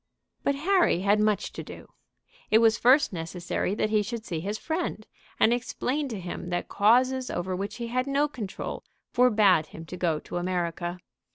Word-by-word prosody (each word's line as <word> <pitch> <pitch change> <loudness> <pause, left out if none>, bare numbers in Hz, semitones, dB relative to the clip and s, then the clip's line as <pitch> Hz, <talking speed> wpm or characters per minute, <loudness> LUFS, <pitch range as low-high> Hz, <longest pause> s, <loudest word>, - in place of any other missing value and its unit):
But 280 - +1
Harry 345 - +2
had 205 +2 +3
much 215 -1 +1
to - - -6
do. - - -11 0.6
It 215 - +6
was 225 -1 +4
first 255 -1 +5
necessary 175 +3 -3
that 215 - 0
he 215 -1 +3
should 225 +2 -5
see 165 -3 -3
his 200 +6 -3
friend, 315 -7 -3 0.3
and 230 - +5
explain 255 +4 -2
to 225 -6 -5
him 180 0 -6
that 175 0 -2
causes 255 +5 +3
over 185 +1 -2
which 200 +3 -4
he 240 - -5
had 255 +2 -1
no 280 +2 +2
control 220 -9 -6 0.3
forbade 210 -10 +4
him 165 - -10
to 180 - -8
go 170 -3 +1
to - - -6
America. 175 -1 -2
215 Hz, 180 wpm, -27 LUFS, 180-250 Hz, 0.6 s, It